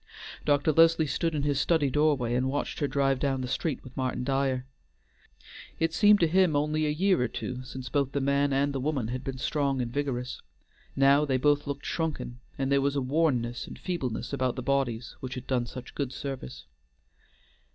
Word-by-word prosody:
Dr. 145 Hz, +1 st, +3 dB
Leslie 165 Hz, +1 st, +5 dB
stood 165 Hz, +3 st, -1 dB
in 145 Hz, -, -1 dB
his 145 Hz, -1 st, +1 dB
study 155 Hz, -5 st, +2 dB
doorway 145 Hz, -5 st, +2 dB
and 130 Hz, +2 st, +1 dB
watched 145 Hz, +2 st, -3 dB
her 145 Hz, -, +1 dB
drive 135 Hz, -1 st, +1 dB
down 135 Hz, -2 st, 0 dB
the 125 Hz, -, -3 dB
street 140 Hz, +2 st, -2 dB
with 130 Hz, -, -13 dB
Martin 130 Hz, -1 st, -2 dB
Dyer. 135 Hz, -1 st, 0 dB, 1.1 s
It 165 Hz, 0 st, +1 dB
seemed 210 Hz, +1 st, +6 dB
to 165 Hz, -, +5 dB
him 180 Hz, -1 st, +3 dB
only 150 Hz, +1 st, +1 dB
a -, -, +1 dB
year 185 Hz, +2 st, +2 dB
or 125 Hz, -, +2 dB
two 125 Hz, +2 st, -5 dB
since 130 Hz, 0 st, -7 dB
both 140 Hz, 0 st, 0 dB
the 140 Hz, -, -1 dB
man 140 Hz, +1 st, +2 dB
and 140 Hz, +1 st, +1 dB
woman 135 Hz, -4 st, -1 dB
had 130 Hz, +2 st, -4 dB
been 135 Hz, -1 st, -4 dB
strong 140 Hz, 0 st, 0 dB
and 120 Hz, -1 st, -3 dB
vigorous; 125 Hz, -3 st, -3 dB, 0.5 s
now 140 Hz, +2 st, +5 dB
they 135 Hz, -3 st, +1 dB
both 145 Hz, +2 st, +2 dB
looked 140 Hz, -1 st, -4 dB
shrunken, 155 Hz, -7 st, -3 dB, 0.2 s
and 135 Hz, 0 st, -1 dB
there 140 Hz, 0 st, +4 dB
was 140 Hz, +1 st, 0 dB
a -, -, +2 dB
wornness 130 Hz, -4 st, 0 dB
and -, -, -9 dB
feebleness 135 Hz, -9 st, -3 dB
about 130 Hz, -2 st, 0 dB
the 130 Hz, -, -5 dB
bodies 125 Hz, -4 st, -1 dB
which 130 Hz, -1 st, -6 dB
had 125 Hz, -1 st, -7 dB
done 125 Hz, -2 st, 0 dB
such 125 Hz, 0 st, -9 dB
good 140 Hz, -3 st, -3 dB
service. 130 Hz, -, -6 dB
140 Hz, 195 wpm, -28 LUFS, 130-150 Hz, 1.1 s, seemed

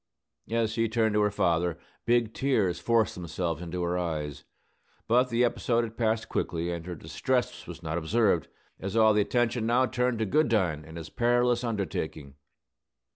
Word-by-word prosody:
As 115 Hz, -1 st, +1 dB
she 115 Hz, 0 st, 0 dB
turned 110 Hz, -1 st, +1 dB
to 105 Hz, -, +3 dB
her 105 Hz, -, +3 dB
father, 85 Hz, -4 st, +1 dB, 0.3 s
big 120 Hz, -2 st, +2 dB
tears 105 Hz, -11 st, +1 dB
forced 115 Hz, -4 st, +2 dB
themselves 85 Hz, -2 st, -3 dB
into 90 Hz, +1 st, -4 dB
her 90 Hz, +1 st, 0 dB
eyes. 75 Hz, -5 st, -4 dB, 0.6 s
But 125 Hz, +3 st, +3 dB
the 120 Hz, +1 st, +2 dB
episode 120 Hz, 0 st, +1 dB
had 115 Hz, -1 st, -6 dB
passed 110 Hz, -1 st, 0 dB
quickly; 85 Hz, -1 st, -2 dB
and 85 Hz, -1 st, -4 dB
her 90 Hz, -, -4 dB
distress 125 Hz, -, -2 dB
was -, -, -9 dB
not 80 Hz, +2 st, -2 dB
observed, 95 Hz, +1 st, +2 dB, 0.3 s
as 95 Hz, +2 st, -4 dB
all 110 Hz, -1 st, +5 dB
attention 115 Hz, +2 st, +1 dB
now 125 Hz, +2 st, +4 dB
turned 125 Hz, -1 st, 0 dB
to 110 Hz, -, 0 dB
Goodine 105 Hz, -, +1 dB
and 80 Hz, +1 st, -10 dB
his 80 Hz, -1 st, -8 dB
perilous 120 Hz, 0 st, +2 dB
undertaking. 90 Hz, -, -3 dB
110 Hz, 165 wpm, -28 LUFS, 85-120 Hz, 0.6 s, all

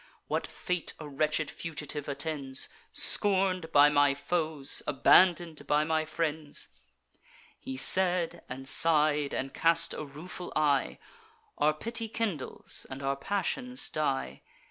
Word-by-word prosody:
What -, -, -2 dB
fate 180 Hz, -4 st, -3 dB
a 155 Hz, -, -8 dB
wretched 150 Hz, +1 st, -1 dB
fugitive 150 Hz, -3 st, -5 dB
attends, 140 Hz, -2 st, -1 dB, 0.2 s
Scorn'd 185 Hz, -4 st, +3 dB
by 145 Hz, 0 st, +6 dB
my 145 Hz, -1 st, +3 dB
foes, 155 Hz, -2 st, 0 dB
abandon'd 170 Hz, +3 st, +3 dB
by 150 Hz, +1 st, +2 dB
my 160 Hz, 0 st, 0 dB
friends?' 155 Hz, -1 st, -3 dB, 0.9 s
He 130 Hz, -, -7 dB
said, 180 Hz, +3 st, +2 dB
and 135 Hz, +1 st, -6 dB
sigh'd, 150 Hz, -2 st, +2 dB
and 135 Hz, +1 st, -4 dB
cast 165 Hz, 0 st, +2 dB
a -, -, -5 dB
rueful 160 Hz, +5 st, -9 dB
eye: 145 Hz, -3 st, +1 dB, 0.6 s
Our 150 Hz, +1 st, +2 dB
pity 230 Hz, +6 st, -3 dB
kindles, 210 Hz, -10 st, -2 dB
and 135 Hz, +1 st, -8 dB
our 135 Hz, 0 st, 0 dB
passions 205 Hz, -, -2 dB
die. 150 Hz, -3 st, -2 dB
155 Hz, 120 wpm, -29 LUFS, 145-175 Hz, 0.9 s, by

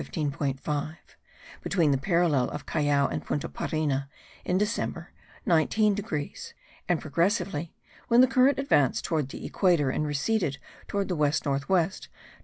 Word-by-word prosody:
5; 145 Hz, 0 st, -3 dB, 0.7 s
between 170 Hz, -7 st, +2 dB
the 135 Hz, -, +3 dB
parallel 165 Hz, -5 st, +2 dB
of -, -, -7 dB
Callao 145 Hz, -2 st, +1 dB
and -, -, -4 dB
Punta 145 Hz, -, -2 dB
Parina, 140 Hz, -3 st, -2 dB, 0.4 s
in 180 Hz, -, 0 dB
December, 210 Hz, +3 st, -2 dB, 0.3 s
19 205 Hz, +3 st, +3 dB
degrees; 175 Hz, -8 st, -5 dB, 0.3 s
and 175 Hz, -3 st, +2 dB
progressively, 170 Hz, 0 st, -1 dB, 0.3 s
when 235 Hz, 0 st, +4 dB
the -, -, +8 dB
current 265 Hz, +2 st, +3 dB
advanced 145 Hz, -, +2 dB
towards 155 Hz, -5 st, 0 dB
the 135 Hz, -, -8 dB
equator 170 Hz, -8 st, +2 dB
and 150 Hz, -, -1 dB
receded 150 Hz, +1 st, 0 dB, 0.3 s
towards 200 Hz, -1 st, -1 dB
the 180 Hz, -, -1 dB
west 150 Hz, 0 st, +1 dB
north 140 Hz, +1 st, -1 dB
west, 185 Hz, -1 st, 0 dB
20. -, -, -36 dB
155 Hz, 145 wpm, -27 LUFS, 145-195 Hz, 0.7 s, the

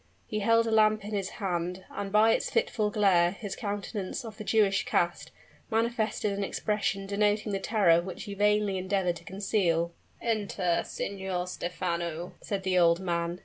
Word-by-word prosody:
He 215 Hz, -, -3 dB
held 230 Hz, +2 st, +4 dB
a 225 Hz, -, -1 dB
lamp 215 Hz, -1 st, +4 dB
in 210 Hz, -, -6 dB
his 195 Hz, -2 st, -2 dB
hand: 180 Hz, -2 st, -2 dB
and, 200 Hz, -1 st, -5 dB
by 215 Hz, +2 st, +5 dB
its -, -, +1 dB
fitful 235 Hz, -, +1 dB
glare, 190 Hz, -4 st, +3 dB
his 205 Hz, -1 st, -6 dB
countenance, 205 Hz, 0 st, -4 dB
of 220 Hz, -2 st, -8 dB
the -, -, -4 dB
Jewish 205 Hz, -3 st, +3 dB
cast, 175 Hz, 0 st, 0 dB, 0.4 s
manifested 220 Hz, -3 st, 0 dB
an 200 Hz, -, -2 dB
expression 205 Hz, -1 st, -1 dB
denoting 210 Hz, +1 st, +1 dB
the 195 Hz, -, -1 dB
terror 195 Hz, -6 st, +3 dB
which 185 Hz, +2 st, -7 dB
he 205 Hz, -2 st, -6 dB
vainly 205 Hz, -1 st, +2 dB
endeavored 185 Hz, -2 st, 0 dB
to -, -, -14 dB
conceal. 180 Hz, -4 st, 0 dB, 0.3 s
"Enter. 200 Hz, -6 st, 0 dB
Signor 190 Hz, -2 st, -3 dB
Stephano," 175 Hz, -1 st, -3 dB
said 195 Hz, -2 st, -3 dB
the 185 Hz, -1 st, +2 dB
old 170 Hz, 0 st, +5 dB
man. 170 Hz, -1 st, -2 dB
200 Hz, 165 wpm, -29 LUFS, 180-210 Hz, 0.4 s, by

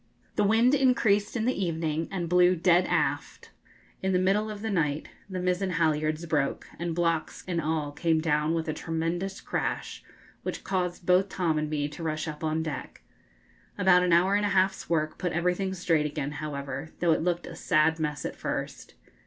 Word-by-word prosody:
The -, -, +2 dB
wind 225 Hz, +5 st, +4 dB
increased 235 Hz, -7 st, +3 dB
in 225 Hz, -2 st, 0 dB
the 255 Hz, -, +2 dB
evening 165 Hz, -3 st, -1 dB
and 180 Hz, -3 st, -3 dB
blew 180 Hz, +1 st, +5 dB
dead 175 Hz, +1 st, +3 dB
aft. -, -, -1 dB, 0.5 s
In 190 Hz, 0 st, 0 dB
the -, -, +4 dB
middle 195 Hz, +4 st, +2 dB
of 210 Hz, 0 st, -7 dB
the 220 Hz, -, -1 dB
night 150 Hz, -5 st, 0 dB, 0.2 s
the 185 Hz, -1 st, -4 dB
mizen 180 Hz, +1 st, 0 dB
halyards 155 Hz, -1 st, +1 dB
broke, 150 Hz, -4 st, -1 dB
and 170 Hz, -1 st, -2 dB
blocks 165 Hz, -2 st, -1 dB
and 170 Hz, -2 st, -1 dB
all 155 Hz, -2 st, -1 dB
came 160 Hz, +2 st, +1 dB
down 155 Hz, 0 st, +1 dB
with 165 Hz, -1 st, -2 dB
a 155 Hz, -, -1 dB
tremendous 165 Hz, +5 st, -3 dB
crash, -, -, -3 dB, 0.4 s
which -, -, -5 dB
caused 180 Hz, -2 st, -2 dB
both 185 Hz, +2 st, +4 dB
Tom 165 Hz, -5 st, 0 dB
and 155 Hz, 0 st, -2 dB
me 145 Hz, -1 st, -1 dB
to 150 Hz, +3 st, -10 dB
rush 155 Hz, -1 st, -2 dB
up 150 Hz, 0 st, -6 dB
on 160 Hz, 0 st, 0 dB
deck. 155 Hz, -3 st, -6 dB, 0.7 s
About 180 Hz, -1 st, +5 dB
an 180 Hz, -1 st, +1 dB
hour 180 Hz, +3 st, +4 dB
and 205 Hz, +1 st, +2 dB
a 205 Hz, -, +1 dB
half's 190 Hz, 0 st, +1 dB
work 155 Hz, -2 st, 0 dB
put 180 Hz, -2 st, -1 dB
everything 180 Hz, +3 st, 0 dB
straight 165 Hz, -4 st, +1 dB
again, 145 Hz, -1 st, -4 dB
however, 140 Hz, -1 st, -5 dB
though 170 Hz, -2 st, +2 dB
it -, -, +2 dB
looked 175 Hz, +1 st, -1 dB
a -, -, -8 dB
sad 160 Hz, 0 st, +2 dB
mess 150 Hz, -2 st, -2 dB
at -, -, -4 dB
first. -, -, -5 dB
170 Hz, 190 wpm, -28 LUFS, 155-185 Hz, 0.7 s, blew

